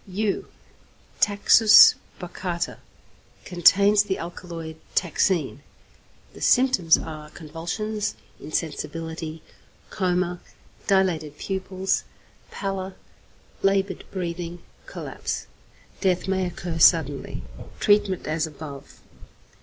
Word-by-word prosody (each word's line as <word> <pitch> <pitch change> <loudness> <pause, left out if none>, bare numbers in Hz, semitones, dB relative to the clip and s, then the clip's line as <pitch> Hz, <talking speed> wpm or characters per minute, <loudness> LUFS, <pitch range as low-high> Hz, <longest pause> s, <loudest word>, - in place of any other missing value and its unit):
=Yew= 200 +2 -2 0.7
(Taxus 210 +2 +7 0.3
baccata) 175 -1 -4 0.7
contains 200 +3 +5
the 200 -2 -2
alkaloid 165 -2 -7 0.2
taxine. 170 -4 +1 0.7
The - - -13
symptoms 245 -11 +4
are 155 -1 -8
convulsions, 175 +8 -4 0.2
insensibility, 160 +1 -4 0.5
coma, 180 -2 0 0.5
dilated 170 -7 +1
pupils, 190 +1 -2 0.5
pallor, 195 -1 -4 0.7
laboured 195 -1 +1
breathing, 175 -2 -5 0.2
collapse. - - -5 0.5
Death 185 -1 +1
may 190 -1 0
occur 175 -1 -5
suddenly. 145 - +3 0.4
Treatment 205 -3 +2
as 160 +1 -1
above. 145 -2 -10
180 Hz, 80 wpm, -24 LUFS, 160-195 Hz, 0.7 s, Taxus